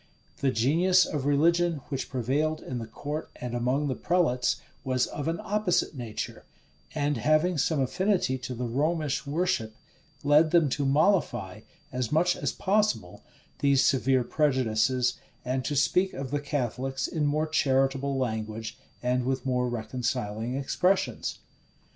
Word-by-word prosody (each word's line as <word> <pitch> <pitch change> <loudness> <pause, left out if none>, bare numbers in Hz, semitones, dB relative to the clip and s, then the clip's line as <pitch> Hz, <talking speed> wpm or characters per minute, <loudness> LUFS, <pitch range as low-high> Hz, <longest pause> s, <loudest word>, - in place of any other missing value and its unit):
The 135 - +1
genius 165 +10 +3
of 145 -3 -3
religion 170 +3 +3
which 135 -2 -3
prevailed 140 +5 0
in 125 -2 -4
the 115 - -6
court 145 +7 -5
and 125 -1 -6
among 125 +5 0
the 135 - 0
prelates, 130 -7 +1 0.3
was 130 -1 +1
of 145 - -5
an 165 0 -1
opposite 205 -6 +1
nature; 120 -6 -6 0.5
and 145 -2 0
having 155 +6 +2
some 155 +2 +1
affinity 175 -1 +1
to 125 0 -5
the 125 +1 -3
Romish 150 +4 -1
worship, 140 -8 -1 0.5
led 150 +2 +5
them 165 -3 +4
to 140 +1 -1
mollify, 135 - +1 0.3
as 125 -3 -2
much 175 +3 +3
as - - -2
possible, 205 - 0 0.4
these 140 -1 +4
severe 130 -1 +3
prejudices, 125 -3 +1 0.3
and 130 +1 -1
to 145 - -1
speak 180 +7 +2
of 135 -1 -5
the 145 0 -1
Catholics 135 -2 -2
in 150 -2 -1
more 155 +2 +1
charitable 135 -2 +1
language, 110 -3 -3 0.2
and 125 0 +1
with 130 +1 -2
more 125 -1 +1
reconciling 120 -1 -3
expressions. 180 +8 0
135 Hz, 140 wpm, -27 LUFS, 125-155 Hz, 0.5 s, led